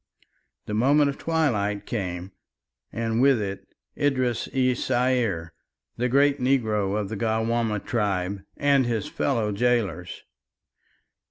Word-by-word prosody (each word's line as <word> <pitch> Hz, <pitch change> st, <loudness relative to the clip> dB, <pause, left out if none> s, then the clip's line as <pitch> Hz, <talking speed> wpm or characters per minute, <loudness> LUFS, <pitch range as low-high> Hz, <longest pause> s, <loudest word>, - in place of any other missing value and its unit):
The 105 Hz, -, -5 dB
moment 140 Hz, +6 st, +4 dB
of 135 Hz, -, -12 dB
twilight 105 Hz, -11 st, 0 dB
came 90 Hz, -4 st, -4 dB, 0.6 s
and 115 Hz, 0 st, -1 dB
with 135 Hz, -3 st, +5 dB
it 100 Hz, -2 st, -5 dB, 0.3 s
Idris 130 Hz, -5 st, 0 dB
es 130 Hz, -1 st, +1 dB
Saier, 120 Hz, -10 st, 0 dB, 0.4 s
the 125 Hz, +2 st, -1 dB
great 140 Hz, +2 st, +3 dB
negro 110 Hz, -6 st, +1 dB
of 105 Hz, -, -2 dB
the 110 Hz, -, -4 dB
Gawaamah 110 Hz, 0 st, 0 dB
tribe, 100 Hz, -4 st, -1 dB, 0.2 s
and 140 Hz, -3 st, +3 dB
his 115 Hz, -4 st, -1 dB
fellow 115 Hz, -6 st, 0 dB
gaolers. 100 Hz, -6 st, -1 dB
115 Hz, 115 wpm, -25 LUFS, 100-130 Hz, 0.6 s, with